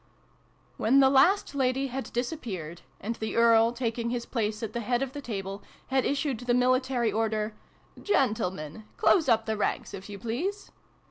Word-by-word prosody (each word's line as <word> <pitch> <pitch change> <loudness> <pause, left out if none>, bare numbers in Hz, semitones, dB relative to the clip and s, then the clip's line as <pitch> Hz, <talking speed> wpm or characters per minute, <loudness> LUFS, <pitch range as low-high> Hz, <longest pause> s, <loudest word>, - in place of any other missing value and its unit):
WHEN 260 +5 +4
the 265 -1 +6
last 290 +7 +4
lady 265 0 +1
had 265 +2 -5
disappeared, 225 - -4 0.2
and 230 +3 -4
the 220 - -4
Earl, 230 0 +5
taking 235 -1 -2
his 240 -1 -3
place 215 -2 -2
at 220 -1 -4
the 235 - -2
head 245 +3 0
of 265 -1 -5
the 290 - -6
table, 195 -5 -5 0.3
had 265 -1 +2
issued 280 -4 -1
the 245 -1 0
military 255 -1 +2
order 220 -1 -1 0.2
" - - -20
Gentle 220 - +2
men! 180 +4 -9
Close 320 -8 +4
up 225 -1 +3
the 220 - -1
ranks, 205 - -2
if 195 +1 -8
you 205 - -7
please 280 - -4
235 Hz, 180 wpm, -28 LUFS, 215-265 Hz, 0.3 s, the